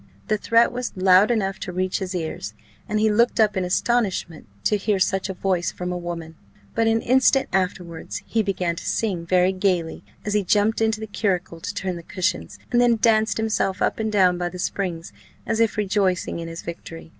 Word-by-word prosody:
The 215 - +2
threat 230 +1 +4
was 245 0 -4
loud 185 +2 +5
enough 200 -4 0
to 180 - -5
reach 185 +1 -1
his 190 -1 -4
ears, 160 - -4 0.3
and 215 - 0
he 215 0 +3
looked 235 +3 +2
up 215 -2 +4
in 190 - 0
astonishment 190 - -1 0.2
to 210 - +2
hear 205 0 0
such 190 +1 0
a 190 - -4
voice 180 -2 0
from 180 0 -5
a - - -2
woman; 170 -2 -6 0.4
but 225 0 +1
an 225 0 +2
instant 265 +2 +3
afterwards 180 -3 -2
he 225 - 0
began 185 -4 -1
to - - -7
sing 185 -7 -1
very 180 +1 +3
gaily, 185 -4 -1 0.2
as 210 - -1
he 210 -1 +2
jumped 210 +4 +2
into 220 -1 +1
the 220 - -4
curricle 190 -5 -2
to 185 - -4
turn 185 -3 -3
the - - -8
cushions, 185 +3 -3
and 240 -1 +4
then 240 -1 +4
danced 220 -1 +3
himself 220 -3 0
up - - 0
and 220 -1 -1
down 185 -4 +3
by 175 0 -1
the 180 - -9
springs, 180 -2 -3 0.3
as 225 - -1
if 230 -1 +2
rejoicing 195 -4 0
in 165 - -5
his 165 0 -7
victory. 165 -1 -8
195 Hz, 205 wpm, -23 LUFS, 180-220 Hz, 0.4 s, loud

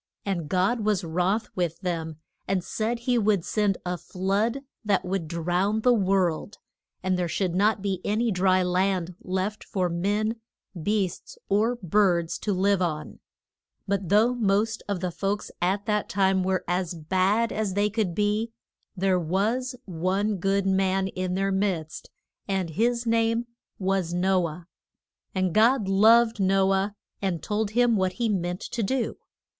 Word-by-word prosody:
And 175 -6 -2
God 190 +6 +2
was 210 -4 0
wroth 180 +6 0
with 170 -3 -1
them, 165 -4 -3 0.3
and 190 -2 0
said 225 +5 -2
he 245 0 +2
would 205 -5 +2
send 205 -3 +1
a 180 -1 -2
flood 200 - -1 0.2
that 200 -3 +1
would 180 -3 -2
drown 180 +6 0
the 250 +2 +5
world, 190 -2 +1 0.5
and 185 -1 +1
there 175 - 0
should 175 +1 -1
not 205 +2 +2
be 190 -3 -1
any 225 +3 +1
dry 185 0 +3
land 180 0 0
left 190 +3 -2
for 185 -3 -1
men, 205 +6 0 0.4
beasts, 200 -1 -2
or 220 +5 +2
birds 180 -4 +1
to 210 - -2
live 195 0 +2
on. 155 -4 -3 0.7
But 195 -3 -1
though 220 +4 +4
most 220 -1 +1
of 200 -3 -2
the 180 -1 -1
folks 200 +4 -2
at 195 +3 0
that 210 -1 0
time 190 -1 +2
were 185 0 0
as 180 -1 -1
bad 190 +8 +1
as 210 -3 -2
they 205 +1 +2
could 205 -5 -1
be, 210 +2 0 0.5
there 185 0 +2
was 215 - -1
one 190 +4 -1
good 195 +2 +1
man 190 0 +1
in 185 -1 -3
their 195 +1 0
midst, 190 -5 -2 0.4
and 190 -4 -1
his 235 +6 +1
name 230 +1 +1 0.3
was 190 -3 -1
No 185 -1 +2
ah. - - -5
[Illustration: 175 - -12
THE 180 - -19
ARK.] 185 - +2
And 180 - -1
God 225 0 +4
loved 225 +3 +5
No 195 0 +3
ah 195 +2 0 0.3
and 185 -5 -2
told 210 0 -1
him 245 -2 +4
what 185 -2 +1
he 235 +1 -1
meant 180 -3 -1
to 235 - -4
do. 240 +4 -1
195 Hz, 165 wpm, -26 LUFS, 180-215 Hz, 0.7 s, the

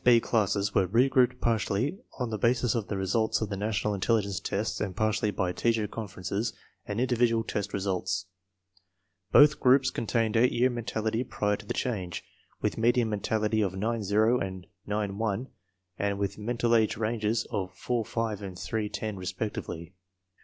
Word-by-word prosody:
Two - - -30
5 - - +8
B - - +6
classes 105 -3 +1
were 95 - +3
re 115 +8 +4
grouped 125 -2 +3
partly 115 - 0 0.2
on 125 -3 -2
the 110 - -2
basis 120 +1 +2
of 115 -4 -2
the 100 - -2
results 105 +4 +1
of 110 - -2
the 100 - -2
National 105 +1 -1
Intelligence 100 -1 +1
Tests 105 +3 -2
and 95 -3 -2
partly 110 +1 +1
by 95 -2 -1
teacher 110 +3 +1
conferences 105 0 -3 0.3
and 100 +2 -2
individual 120 -2 +2
test 105 -2 -3
results. 95 -1 -1 1.1
Both 150 +1 +7
groups 130 0 +4
contained 115 -1 0
8 120 +2 +5
year 125 +2 +2
mentality 115 0 -2
prior 105 -4 0
to 105 0 -12
the - - -2
change, 95 -9 -2 0.4
with - - -1
median 120 0 +3
mentality 110 +1 0
of 95 -2 0
9 110 +4 -1
0 110 +5 +3
and 95 -2 -5 0.2
9 105 -1 -2
1 115 +3 -1 0.5
and 100 0 0
with 100 +1 -2
mental 120 +2 +1
age 110 -1 +2
ranges 110 0 0
of 95 -2 -2
4 120 -2 -1
5 110 -2 -2
and 95 -2 -7
3 110 +2 -2
10, 105 -1 -4
respectively. 90 -2 -5
110 Hz, 175 wpm, -28 LUFS, 100-115 Hz, 1.1 s, 5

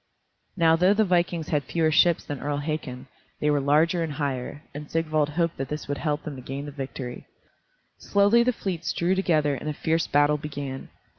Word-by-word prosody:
Now 165 -2 +5
though 180 +4 +4
the 220 0 +3
vikings 175 -3 0
had 150 -2 +1
fewer 160 +3 +1
ships 170 +2 +4
than 145 -2 -5
Earl 145 +1 -2
Hakon, 145 -4 -4 0.3
they 150 - +2
were 145 -1 +2
larger 155 +5 +3
and 160 -3 -2
higher, 145 0 -3
and 145 +1 -8
Sigvald 155 -2 0
hoped 165 +2 -1
that 135 -1 -4
this 150 +1 -5
would 145 -1 -3
help 150 0 -1
them 150 - -6
to - - -8
gain 135 +3 -6
the 145 - -7
victory. 135 -3 -7 0.7
Slowly 205 +4 +4
the 250 +1 +3
fleets 175 -7 -3
drew 175 +2 +1
together 155 -6 +2
and 140 +3 -4
a - - -2
fierce 160 +2 0
battle 145 +1 +3
began. 140 -3 -6
150 Hz, 200 wpm, -25 LUFS, 145-170 Hz, 0.7 s, Now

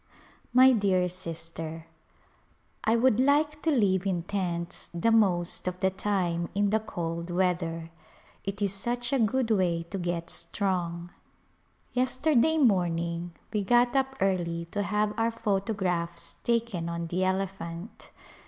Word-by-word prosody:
My 255 +2 +7
dear 195 -6 +2
Sister: 165 -2 -6 1.0
I 225 - +3
would 240 -1 +3
like 295 +3 +2
to 325 - +1
live 200 - +2
in 175 -3 0
tents 175 -3 -3
the 200 +7 +2
most 185 -6 +2
of 180 0 -2
the 190 0 +2
time 180 -4 -1
in 205 0 +2
the 220 - +3
cold 170 -5 -4
weather; 170 -2 -1 0.5
it 200 +1 -3
is 200 -1 +1
such 240 +5 -2
a 270 - +3
good 230 +1 +1
way 175 -5 +2
to 195 - -3
get 175 -1 -2
strong. 175 -3 -2 0.8
Yesterday 260 +4 +2
morning 175 - +1 0.2
we 210 -2 +1
got 240 +5 +3
up 270 0 +1
early 170 -3 0
to 205 - -1
have 210 +1 0
our 225 0 +3
photographs 195 -6 -1
taken 230 -8 0
on 170 0 -3
the 175 +3 -1
elephant. 190 0 -3
190 Hz, 135 wpm, -28 LUFS, 170-225 Hz, 1.0 s, My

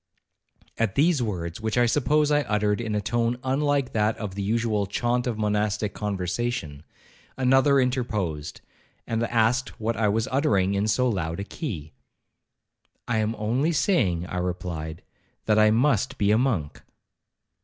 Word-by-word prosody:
At 115 -4 0
these 155 -1 +3
words, 90 -5 -3
which 110 +1 -2
I 120 - +5
suppose 150 +4 +2
I 145 0 +4
uttered 105 -3 0
in 110 -2 -2
a 105 - 0
tone 120 +3 0
unlike 140 0 0
that 110 0 +1
of 105 -4 -5
the 100 - -4
usual 105 -1 0
chaunt 120 +4 0
of 115 -3 -2
monastic 105 -1 0
conversation, 95 - -3 0.6
another 135 +2 +4
interposed, 105 - -2 0.4
and 115 0 -2
asked 120 +3 +1
what 115 +1 -1
I 110 -1 +1
was 110 +4 0
uttering 100 -9 +2
in 100 +2 0
so 125 +4 +2
loud 85 -7 -2
a - - -2
key? 95 - -6 1.1
'I 120 - 0
am 110 +1 0
only 120 +10 0
saying,' 110 - +1
I 90 - -5
replied, 90 -2 -4 0.4
'that 110 0 +3
I 110 0 +6
must 125 +2 +2
be 105 -1 +2
a 110 - +4
monk.' 110 - -1
110 Hz, 155 wpm, -25 LUFS, 100-125 Hz, 1.1 s, I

